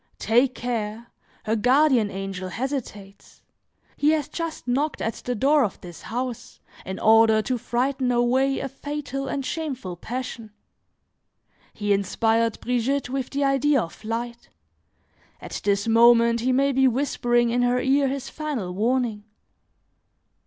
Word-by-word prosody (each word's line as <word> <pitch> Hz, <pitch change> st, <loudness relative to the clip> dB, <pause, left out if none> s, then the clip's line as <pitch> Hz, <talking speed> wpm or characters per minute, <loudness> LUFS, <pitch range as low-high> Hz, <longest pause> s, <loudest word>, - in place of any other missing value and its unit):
Take 245 Hz, +3 st, +2 dB
care! 230 Hz, -1 st, -4 dB, 0.3 s
her 220 Hz, -, +1 dB
guardian 250 Hz, -1 st, +3 dB
angel 195 Hz, -1 st, -5 dB
hesitates; 215 Hz, -5 st, -6 dB, 0.5 s
he 295 Hz, -, +2 dB
has 300 Hz, -3 st, -1 dB
just 330 Hz, -6 st, -5 dB
knocked 280 Hz, +5 st, 0 dB
at 225 Hz, -, -2 dB
the 245 Hz, -, -4 dB
door 280 Hz, +5 st, +3 dB
of 205 Hz, -, -3 dB
this 175 Hz, -2 st, -11 dB
house, 245 Hz, +1 st, -5 dB, 0.3 s
in 190 Hz, 0 st, -4 dB
order 220 Hz, 0 st, +5 dB
to 255 Hz, 0 st, -2 dB
frighten 250 Hz, +2 st, -1 dB
away 255 Hz, +3 st, +2 dB
a 275 Hz, -, -3 dB
fatal 275 Hz, 0 st, -5 dB
and 275 Hz, 0 st, -3 dB
shameful 265 Hz, -, -4 dB
passion! 235 Hz, +2 st, -6 dB, 1.2 s
He 205 Hz, -1 st, 0 dB
inspired 225 Hz, +3 st, +1 dB
Brigitte 250 Hz, +2 st, -1 dB
with 265 Hz, -2 st, -2 dB
the 280 Hz, +1 st, -1 dB
idea 275 Hz, +1 st, +3 dB
of 170 Hz, -7 st, -4 dB
flight; 235 Hz, +2 st, -6 dB, 0.9 s
at -, -, -7 dB
this 200 Hz, +1 st, +1 dB
moment 235 Hz, 0 st, +5 dB
he 250 Hz, +3 st, 0 dB
may 275 Hz, +2 st, +2 dB
be 265 Hz, 0 st, +3 dB
whispering 240 Hz, -2 st, +1 dB
in 245 Hz, +1 st, +1 dB
her 245 Hz, 0 st, +2 dB
ear 275 Hz, +2 st, +2 dB
his 270 Hz, 0 st, -4 dB
final 275 Hz, -12 st, -4 dB
warning. 225 Hz, +1 st, 0 dB
245 Hz, 140 wpm, -24 LUFS, 225-270 Hz, 1.2 s, order